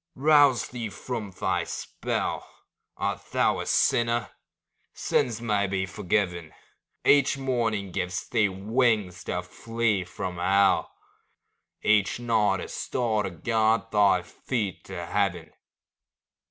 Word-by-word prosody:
Rouse 145 -4 +4
thee 120 -3 -5
from 110 +1 -5
thy 95 - -1
spell; - - -3 0.5
Art - - -2
thou - - +2
a - - -5
sinner? 120 -1 +2 0.6
Sins 115 -3 0
may 105 -4 0
be 95 0 -1
forgiven; 90 -3 -2 0.5
Each 140 -1 +4
morning 115 -7 -1
gives 90 +1 -3
thee 105 -2 +2
wings 105 -2 0
to 90 0 -2
flee 115 +1 -1
from 90 0 -6
hell, 95 +3 +3 0.9
Each 105 0 +3
night 110 -5 +1
a - - -6
star 115 -4 -1
to 100 - -2
guide 110 +5 +1
thy 100 -4 +4
feet 105 -1 -4
to 85 -3 -6
heaven. 90 -4 -1
105 Hz, 115 wpm, -26 LUFS, 95-115 Hz, 0.9 s, Rouse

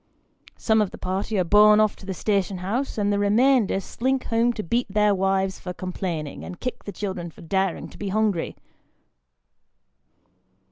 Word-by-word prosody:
Some 220 -1 +2
of 205 - 0
the - - -10
party 190 +3 -2
are 185 - +3
borne 210 +4 +6
off 215 -1 +3
to 195 - -13
the 190 - -3
station 195 -1 0
house, 220 +11 -3
and 205 -1 +1
the 200 - +1
remainder 220 +1 +3
slink 260 +7 -1
home 230 +1 +2
to 215 - -5
beat 235 +8 0
their 210 0 +3
wives 190 0 0
for 180 - -6
complaining, 175 -5 -4
and 180 - -8
kick 250 - -5
the 205 - -5
children 190 -3 -4
for - - -16
daring 190 +2 -1
to - - -15
be 200 - -3
hungry. 205 -4 0
200 Hz, 175 wpm, -24 LUFS, 185-215 Hz, -, borne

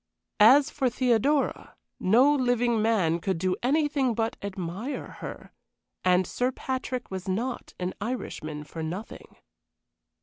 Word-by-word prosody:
As 270 +7 +7
for 265 -3 +1
Theodora, 255 +4 +1 0.2
no 250 +9 +5
living 245 -4 +2
man 190 -7 +2
could 190 +1 -1
do 185 +2 0
anything 280 -2 +1
but 225 0 -1
admire 195 +6 -5
her, - - -8 0.5
and 185 0 +4
Sir 250 +8 -1
Patrick 255 -2 -4
was 190 -1 -5
not 235 +7 -3
an 180 0 -2
Irishman 155 -10 -4
for 160 +2 -8
nothing. 175 +7 -7
225 Hz, 125 wpm, -27 LUFS, 185-255 Hz, 0.5 s, As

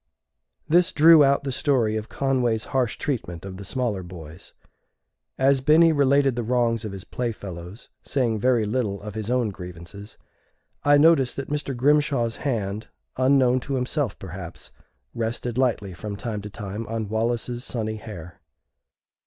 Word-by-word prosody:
This 175 +3 +4
drew 160 0 +7
out 140 0 +3
the 135 - -2
story 125 -6 +1
of 110 0 -4
Conway's 125 -5 0
harsh 125 -4 +1
treatment 95 - -4
of 95 -1 -7
the 100 - -8
smaller 115 -2 -2
boys. 85 -2 -11 0.8
As 135 0 +3
Binny 160 +4 +5
related 140 -2 +3
the 120 - -1
wrongs 115 -1 +1
of 105 - -5
his 95 -1 -8
playfellows, 100 -5 -6
saying 120 -6 0
very 120 -1 +2
little 105 -3 -1
of 105 -1 -6
his 110 0 -4
own 125 -3 +1
grievances, 90 +2 -9 0.7
I 145 0 +6
noticed 145 -4 +4
that 140 +1 -5
Mr. 145 -3 -2
Grimshaw's 135 -3 +2
hand, 110 -6 -2 0.3
unknown 130 -1 +3
to 135 +2 -4
himself 130 -1 -1
perhaps, 90 -2 -9 0.4
rested 120 +1 -3
lightly 110 -7 0
from 100 +4 -6
time 105 0 -4
to 105 - -7
time 105 +2 -6
on 110 -1 -3
Wallace's 120 +3 -2
sunny 110 -4 -3
hair. 90 -6 -10
115 Hz, 150 wpm, -24 LUFS, 105-135 Hz, 0.8 s, drew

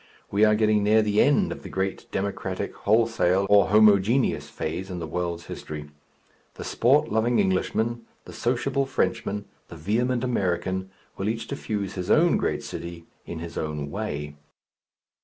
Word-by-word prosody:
We 100 +2 +3
are 105 0 +4
getting 105 -1 +3
near 110 +1 +4
the 105 0 +2
end 180 +7 +3
of - - -6
the - - -9
great 95 0 -3
Democratic, 100 +1 -3
Wholesale, 100 -4 +2
or 100 -1 +6
Homogeneous 105 +4 +4
phase 90 +5 -4
in 90 - -5
the 85 - -4
world's 85 +1 -3
history. 75 -1 -7 0.6
The - - -7
sport 130 +5 +2
loving 115 +2 +2
Englishman, 110 +4 0 0.2
the - - -10
sociable 130 +3 0
Frenchman, 110 -5 -1 0.2
the - - -10
vehement 120 +8 0
American 95 -5 -1 0.3
will 95 +2 -1
each 115 0 -3
diffuse 105 -7 -4
his 90 -1 -5
own 170 +2 +5
great - - -1
city 85 -1 -7 0.2
in 85 - -5
his 85 +1 -6
own 75 -2 -4
way. 75 -9 -4
105 Hz, 155 wpm, -25 LUFS, 90-115 Hz, 0.6 s, or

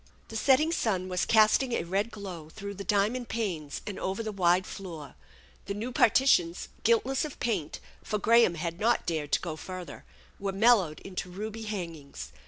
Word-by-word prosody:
The 225 - -8
setting 275 +7 +4
sun 190 - 0
was 180 0 0
casting 220 +3 +4
a - - 0
red 195 +6 -1
glow 185 -8 -8
through 200 +5 -7
the 200 0 -7
diamond 210 +6 0
panes 175 -11 -3
and 205 - -5
over 195 +4 -2
the 215 - -3
wide 185 -1 +3
floor. 165 -7 -8 0.5
The 200 - -3
new 225 +5 -4
partitions, 220 -8 +3
guiltless 235 +4 +2
of 300 -2 -6
paint, 190 -10 -2 0.2
for 210 - -1
Graham 230 -4 +4
had 170 +1 -4
not 235 +3 +2
dared 155 -3 -2
to - - +3
go 165 -3 -4
further, 185 +2 -8 0.4
were 195 -1 -2
mel 230 +5 +6
lowed 160 -6 -4
into 185 -1 -5
ruby 215 +4 -6
hangings. 165 - -6
200 Hz, 180 wpm, -29 LUFS, 175-225 Hz, 0.5 s, mel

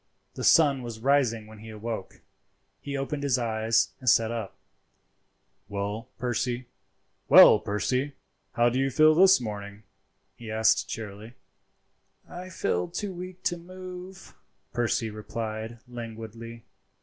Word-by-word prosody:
The - - -6
sun 145 -5 +5
was 120 -2 -7
rising 125 -4 +2
when 110 0 -13
he 110 +1 -11
awoke. 110 -2 -6 0.6
He 140 0 -5
opened 140 +2 -3
his 140 -3 +2
eyes 115 -1 +1
and 130 - +1
sat 115 0 +4
up. 115 -4 -5 1.1
"Well, 105 +4 -4
Percy, 125 0 -2 0.6
how 120 +2 +4
do 125 +2 -1
you 135 0 +1
feel 155 +3 +5
this 190 +3 +6
morning?" 105 -2 -7 0.5
he 115 0 -10
asked 110 -3 +2
cheerily. 110 +2 -7 0.9
"I 180 +1 -8
feel 90 - -1
too 205 -2 -4
weak 180 +1 -9
to 175 - 0
move," 185 +1 -10 0.4
Percy 115 -2 0
replied 110 +1 -5
languidly. 115 -1 -8
115 Hz, 120 wpm, -27 LUFS, 110-140 Hz, 1.1 s, this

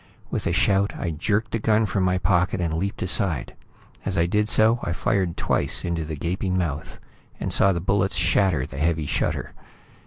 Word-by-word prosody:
With - - -2
a - - +1
shout, 100 0 +2
I 85 - -2
jerked 100 +8 -1
the 115 - -1
gun 110 +1 +2
from 95 -1 -1
my 90 0 +2
pocket 90 +1 +1
and 85 -2 -1
leaped 95 +5 -2
aside. 90 -6 +1 0.5
As 95 -1 -2
I 85 - +3
did 105 +4 +1
so, 110 +2 +4
I 85 - -2
fired 90 -1 -1
twice - - 0
into 85 -2 -2
the 80 0 -5
gaping 90 +4 -2
mouth, 80 -4 -3 0.4
and - - -2
saw 95 - +5
the 85 -2 -2
bullets 95 +1 +1
shatter 90 -5 +2
the 70 - -8
heavy 80 0 0
shutter. - - -2
90 Hz, 190 wpm, -24 LUFS, 85-100 Hz, 0.5 s, saw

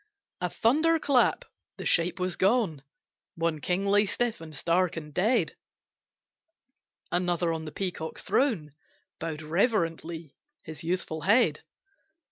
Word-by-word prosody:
A 180 - -1
thunder 315 - +3
clap 285 - +2 0.3
the - - -7
shape 170 +2 +2
was 185 0 -1
gone! 195 - +2 0.5
One 165 -2 -1
king 180 +5 0
lay 205 +1 +4
stiff, 240 -2 -1
and 155 -1 -9
stark, 170 +3 +1
and 150 -2 -7
dead, 210 - +2 1.6
Another 175 -1 +1
on 160 -1 -4
the 155 - -6
peacock 175 -4 -4
throne 200 - 0 0.5
Bowed 160 -1 -4
reverently 165 - -1 0.3
his 160 0 -9
youthful 165 -2 -2
head. 190 -6 +3
175 Hz, 120 wpm, -28 LUFS, 160-205 Hz, 1.6 s, lay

